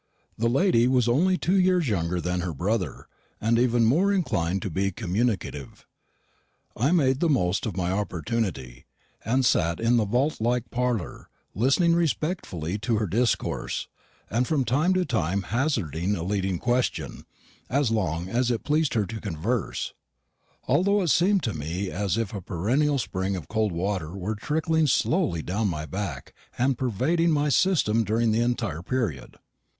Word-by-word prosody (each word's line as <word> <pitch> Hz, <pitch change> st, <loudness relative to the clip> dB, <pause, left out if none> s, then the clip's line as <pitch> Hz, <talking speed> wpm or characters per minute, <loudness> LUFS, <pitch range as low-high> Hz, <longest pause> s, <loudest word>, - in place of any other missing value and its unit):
The 115 Hz, +2 st, +1 dB
lady 125 Hz, -3 st, +3 dB
was 125 Hz, -2 st, +2 dB
only 180 Hz, +10 st, +3 dB
two 190 Hz, +3 st, +2 dB
years 180 Hz, -4 st, +3 dB
younger 90 Hz, -4 st, 0 dB
than 90 Hz, +1 st, -1 dB
her 85 Hz, -3 st, -4 dB
brother, 95 Hz, +5 st, -2 dB, 0.3 s
and 115 Hz, +2 st, +2 dB
even 120 Hz, -1 st, +3 dB
more 170 Hz, -, +3 dB
inclined 95 Hz, -, 0 dB
to 100 Hz, -, -3 dB
be 95 Hz, +4 st, 0 dB
communicative. 100 Hz, -, -3 dB, 0.9 s
I 135 Hz, +7 st, +1 dB
made 135 Hz, -7 st, +3 dB
the 170 Hz, -, +2 dB
most 100 Hz, -, +1 dB
of 100 Hz, -3 st, -5 dB
my 90 Hz, -1 st, 0 dB
opportunity, 90 Hz, -, -3 dB, 0.4 s
and 130 Hz, +4 st, +1 dB
sat 85 Hz, -6 st, +2 dB
in 115 Hz, +1 st, +3 dB
the 110 Hz, -, +2 dB
vault 125 Hz, +6 st, 0 dB
like 120 Hz, 0 st, 0 dB
parlour 120 Hz, -7 st, -2 dB, 0.2 s
listening 135 Hz, -, +3 dB
respectfully 150 Hz, -, -1 dB
to 115 Hz, +1 st, 0 dB
her 105 Hz, -, 0 dB
discourse, 115 Hz, +6 st, -1 dB, 0.4 s
and 120 Hz, +4 st, 0 dB
from 145 Hz, -5 st, +1 dB
time 150 Hz, +11 st, +2 dB
to 185 Hz, -1 st, +1 dB
time 100 Hz, -, -1 dB
hazarding 100 Hz, -, -1 dB
a 85 Hz, -, -4 dB
leading 95 Hz, -1 st, -1 dB
question, 125 Hz, +5 st, -1 dB, 0.5 s
as 135 Hz, -1 st, +1 dB
long 90 Hz, -6 st, -1 dB
as 120 Hz, +5 st, 0 dB
it 120 Hz, -2 st, -1 dB
pleased 150 Hz, -2 st, +1 dB
her 105 Hz, -3 st, +2 dB
to 110 Hz, +1 st, -7 dB
converse; 100 Hz, +5 st, -2 dB, 0.7 s
although 200 Hz, +2 st, +3 dB
it 170 Hz, -, 0 dB
seemed 190 Hz, +1 st, +3 dB
to 110 Hz, -, -1 dB
me 85 Hz, +6 st, -4 dB
as 100 Hz, +2 st, -1 dB
if 115 Hz, -4 st, -2 dB
a 100 Hz, -, -4 dB
perennial 125 Hz, -, 0 dB
spring 95 Hz, -5 st, -2 dB
of 90 Hz, -, -6 dB
cold 110 Hz, -2 st, 0 dB
water 90 Hz, 0 st, -3 dB
were 100 Hz, +3 st, -2 dB
trickling 160 Hz, +7 st, 0 dB
slowly 140 Hz, -, +1 dB
down 105 Hz, +4 st, -1 dB
my 80 Hz, -4 st, -3 dB
back 80 Hz, -5 st, -5 dB, 0.2 s
and 130 Hz, +2 st, +2 dB
pervading 160 Hz, -, +1 dB
my 150 Hz, -2 st, +2 dB
system 135 Hz, -, +2 dB
during 110 Hz, +2 st, +1 dB
the 110 Hz, +2 st, +2 dB
entire 115 Hz, -9 st, -1 dB
period. 100 Hz, -, -3 dB
115 Hz, 160 wpm, -26 LUFS, 95-135 Hz, 0.9 s, lady